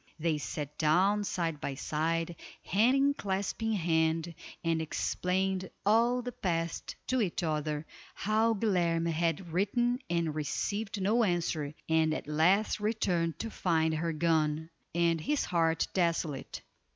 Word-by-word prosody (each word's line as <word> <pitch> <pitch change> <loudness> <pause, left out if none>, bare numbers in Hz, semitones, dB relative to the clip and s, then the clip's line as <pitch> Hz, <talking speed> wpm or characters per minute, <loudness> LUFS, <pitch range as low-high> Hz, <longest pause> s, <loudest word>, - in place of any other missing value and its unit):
They 160 -1 0
sat 150 0 -5
down 190 +7 +3
side 165 -6 -2
by 140 - -3
side, 165 +4 -1 0.3
hand 270 +8 +3
clasping 200 +3 -1
hand, 165 -2 +1 0.3
and 165 -1 +1
explained 185 +4 -1 0.2
all 235 +4 +3
the 245 - -4
past 170 -6 -2
to 255 -1 +1
each 185 -3 -1
other, 155 -1 -1 0.3
how 220 +2 +2
Guilerme 170 -5 +1
had 165 +1 -1
written 240 +7 +1
and 170 -3 0
received 200 +8 -2
no 215 +5 +3
answer, 165 -6 -1
and 160 -1 +3
at - - -5
last 180 +9 +3
returned 185 -6 0
to 225 - -4
find 160 -4 +1
her 165 +2 -1
gone, 160 0 +1 0.2
and 170 -1 +2
his 295 - 0
heart 165 -2 +1
desolate. 165 -6 -1
170 Hz, 130 wpm, -31 LUFS, 160-205 Hz, 0.3 s, down